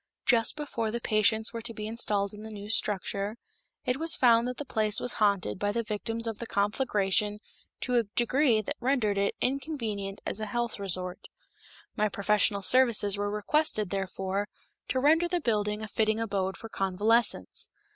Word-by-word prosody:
Just 230 -3 +3
before 275 -7 -3
the 235 +2 -3
patients 220 0 +2
were 230 - -4
to 230 0 -2
be 210 - -5
installed 210 -3 -1
in 210 - -10
the 220 - -8
new 205 -1 -8
structure, 205 0 0 0.5
it 250 - 0
was 325 +2 +3
found 235 -1 +4
that 250 0 -4
the 290 - -5
place 215 -4 0
was 245 - +1
haunted 200 -3 +1
by 205 0 0
the 230 +2 -1
victims 225 +2 -2
of 225 -2 -4
the 235 - -6
conflagration 205 -1 0 0.4
to 250 -1 +1
a 235 - +3
degree 240 -2 +3
that - - -4
rendered 235 -6 +1
it 200 - 0
inconvenient 230 -8 -2
as - - -2
a 215 - -3
health 240 0 -2
resort. 180 -2 -3 0.7
My 215 -1 +1
professional 200 +1 +2
services 225 -2 +5
were 205 0 -2
requested, 210 - 0
therefore, 195 +1 -2 0.4
to 260 - 0
render 320 +5 +4
the 355 0 0
building 210 -5 -1
a - - -4
fitting 220 +1 0
abode 195 -4 -2
for 225 - -9
convalescents. 210 +4 +1
215 Hz, 175 wpm, -28 LUFS, 205-235 Hz, 0.7 s, services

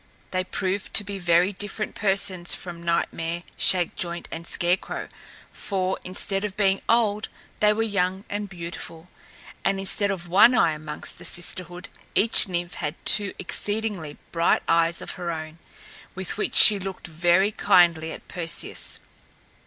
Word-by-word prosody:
They 185 0 -1
proved 190 +1 -3
to 210 - +5
be 200 -1 -6
very 175 +2 +3
different 205 +2 -4
persons 195 -3 0
from 175 -2 -7
Nightmare, 170 0 -2
Shakejoint 175 -1 0
and 165 0 -6
Scarecrow; 175 +2 -1 0.4
for, 190 -2 -2
instead 195 +2 -3
of 205 -2 -5
being 195 -2 +2
old, 215 -3 +2 0.3
they 210 0 +4
were 220 +1 0
young 190 -2 -1
and 205 0 -4
beautiful; 170 -1 -8 0.5
and 195 - +1
instead 200 +1 +1
of 180 -3 -4
one 205 +8 +6
eye 165 - +4
amongst 150 -1 -5
the - - -9
sisterhood, 175 0 -3 0.3
each 220 0 +5
Nymph 175 -1 -3
had 150 0 -4
two 205 -2 +4
exceedingly 205 -5 -2
bright 170 0 +2
eyes 165 0 +2
of - - -6
her 175 - -3
own, 160 0 -6 0.6
with 190 -1 -4
which 210 - -3
she 210 -2 +9
looked 190 0 -7
very 175 +4 +2
kindly 170 -6 +3
at - - -10
Perseus. 165 -2 -1
185 Hz, 145 wpm, -24 LUFS, 170-200 Hz, 0.6 s, she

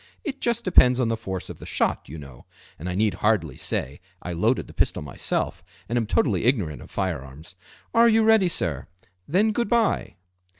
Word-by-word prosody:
It 275 -5 -5
just 235 -1 0
depends 125 -9 +5
on 120 -3 +1
the 115 - +1
force 95 -5 -5
of - - -9
the - - -10
shot, - - -1
you 80 - -8
know, 70 -4 -12 0.3
and 85 +4 -5
I 90 - -3
need 105 0 +2
hardly 105 +2 0
say 70 +6 -3 0.2
I 90 - -5
loaded 85 - +1
the - - -14
pistol - - 0
myself, 70 - -2 0.2
and 115 - -3
am 115 -3 0
totally 100 -2 +1
ignorant 100 - +1
of - - -12
fire 95 -7 -2
arms. 70 +6 -13 0.4
Are 235 0 +6
you 225 0 +4
ready, 220 -4 +5
sir? 80 - -2 0.4
then 205 +7 +2
Good 235 0 -1
bye!" 230 - +1
110 Hz, 200 wpm, -24 LUFS, -, 0.4 s, Are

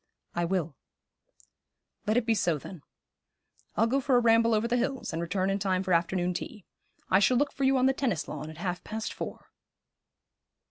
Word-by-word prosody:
'I 175 0 0
will.' 170 -4 -1 1.3
'Let 215 +2 +3
it 245 - +1
be 230 - +3
so, 175 -7 +1
then. 170 +3 -10 0.9
I'll - - +3
go 265 +4 +1
for 265 -1 +2
a - - +6
ramble 230 -1 +4
over 215 +2 +1
the 240 - +1
hills, 255 -4 -2
and 165 - -2
return 185 +3 0
in 195 - 0
time 190 -1 0
for 185 -1 0
afternoon 175 +1 +1
tea. 210 +2 -6 0.5
I 190 - +6
shall 245 +5 +4
look 285 +2 +1
for 275 - -1
you 265 0 +4
on 255 - +3
the 265 - +4
tennis 240 - -1
lawn 155 - -6
at 160 - -10
half 180 +1 -3
past 220 0 -4
four.' - - -7
205 Hz, 195 wpm, -29 LUFS, 180-245 Hz, 1.3 s, a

